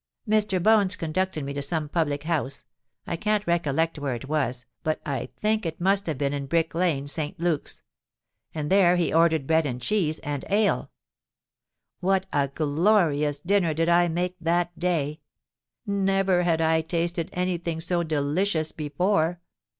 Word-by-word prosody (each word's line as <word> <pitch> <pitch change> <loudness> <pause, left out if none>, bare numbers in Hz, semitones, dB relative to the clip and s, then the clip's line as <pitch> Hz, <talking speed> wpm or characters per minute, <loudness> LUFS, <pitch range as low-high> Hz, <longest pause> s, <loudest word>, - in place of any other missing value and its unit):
"Mr. 210 -2 +2
Bones 205 -3 +4
conducted 170 -1 -2
me 140 - -4
to 140 - -3
some 150 +2 -2
public 145 -2 -1
house—I 140 -3 -4
can't 210 +3 0
recollect 165 -1 0
where 140 -3 -2
it 125 +3 -8
was, 130 -5 -1 0.2
but 155 0 -1
I 140 -3 -3
think 215 +1 +1
it 165 -2 -4
must 195 +2 +2
have 155 -4 -2
been 140 0 -1
in 140 -1 -3
Brick 165 +2 +1
Lane, 165 -5 0
St. 155 +4 -4
Luke's,—and 155 -2 -6
there 185 -2 +5
he 175 -3 0
ordered 160 -3 +3
bread 160 +1 +2
and 125 -2 -4
cheese 160 - 0
and 145 -3 -3
ale. 205 +1 +1 1.1
What 190 +1 +1
a 140 -1 +2
glorious 150 0 +2
dinner 175 0 +1
did 165 +2 +1
I 175 0 +4
make 175 +2 -2
that 175 +1 0
day! 155 -4 -1 0.7
Never 195 -2 +2
had 165 -2 +1
I 160 0 +3
tasted 170 0 -2
any 180 -1 -1
thing 165 -1 -3
so 175 +1 0
delicious 160 +2 0
before! 165 +3 0
165 Hz, 155 wpm, -25 LUFS, 150-180 Hz, 1.1 s, there